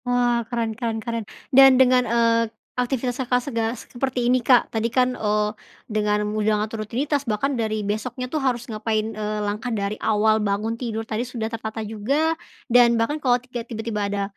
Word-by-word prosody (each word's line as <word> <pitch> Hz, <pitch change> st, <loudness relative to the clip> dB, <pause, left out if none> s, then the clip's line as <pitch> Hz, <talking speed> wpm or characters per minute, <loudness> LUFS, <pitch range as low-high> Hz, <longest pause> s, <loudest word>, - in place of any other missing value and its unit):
Wah, 245 Hz, -1 st, +2 dB
keren 230 Hz, -2 st, -1 dB
keren 225 Hz, 0 st, -3 dB
keren. 230 Hz, 0 st, -3 dB, 0.3 s
Dan 270 Hz, 0 st, +8 dB
dengan, 250 Hz, -2 st, +4 dB
eee, 230 Hz, -1 st, +3 dB, 0.2 s
aktivitas 250 Hz, 0 st, -1 dB
Kakak, 250 Hz, -1 st, +1 dB
sega 230 Hz, -3 st, -1 dB
seperti 250 Hz, +1 st, -3 dB
ini, 250 Hz, +1 st, +3 dB
Kak, 245 Hz, 0 st, +3 dB
tadi 225 Hz, +1 st, 0 dB
kan, 250 Hz, +1 st, +2 dB
eee, 210 Hz, -2 st, 0 dB, 0.3 s
dengan 210 Hz, -1 st, 0 dB
udah 215 Hz, 0 st, +1 dB
ngatur 220 Hz, 0 st, -6 dB
rutinitas 275 Hz, +7 st, -1 dB
bahkan 245 Hz, +7 st, 0 dB
dari 215 Hz, -3 st, -1 dB
besoknya 240 Hz, +5 st, -3 dB
tuh 295 Hz, +4 st, -3 dB
harus 245 Hz, -3 st, 0 dB
ngapain, 220 Hz, -1 st, -2 dB
eee, 210 Hz, 0 st, -3 dB
langkah 210 Hz, +4 st, -3 dB
dari 210 Hz, -2 st, -2 dB
awal 220 Hz, 0 st, +3 dB
bangun 210 Hz, +2 st, -1 dB
tidur 230 Hz, -2 st, -4 dB
tadi 220 Hz, 0 st, -2 dB
sudah 235 Hz, -2 st, -4 dB
tertata 220 Hz, 0 st, -4 dB
juga 270 Hz, +10 st, 0 dB, 0.3 s
dan 240 Hz, -1 st, +5 dB
bahkan 295 Hz, +7 st, 0 dB
kalau 245 Hz, -3 st, +3 dB
ke 250 Hz, -1 st, -7 dB
tiba-tiba 220 Hz, -3 st, -3 dB
ada 200 Hz, 0 st, -1 dB
230 Hz, 175 wpm, -23 LUFS, 215-250 Hz, 0.3 s, Dan